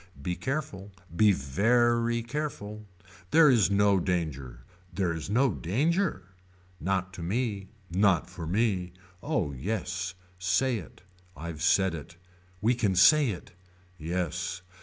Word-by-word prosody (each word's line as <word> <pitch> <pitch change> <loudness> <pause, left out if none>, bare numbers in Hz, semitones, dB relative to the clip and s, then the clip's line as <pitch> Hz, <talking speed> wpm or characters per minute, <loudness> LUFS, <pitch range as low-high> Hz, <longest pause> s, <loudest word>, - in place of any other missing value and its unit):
Be 90 +6 -3
careful. 115 - -4 0.2
Be 105 +4 +5
very 115 - +2
careful. 110 -6 -5 0.4
There 160 +1 +6
is 115 -6 +4
no 100 -1 +3
danger. 70 -9 -3 0.3
There 90 -2 -1
is 80 +2 -6
no 125 +4 +3
danger. 155 - 0 0.6
Not 95 0 -1
to 90 - -8
me. 100 +1 -2 0.2
Not 95 -2 +3
for 80 - -7
me. 95 -2 0 0.3
Oh 140 - -1
yes. 90 - -3 0.2
Say 95 +7 +1
it. - - -13 0.3
I've 80 0 -6
said 95 0 +3
it. 85 +1 -8 0.5
We 115 +4 +3
can 105 -6 0
say. 135 - +5 0.6
Yes. 90 +2 -3
95 Hz, 120 wpm, -28 LUFS, 85-115 Hz, 0.6 s, There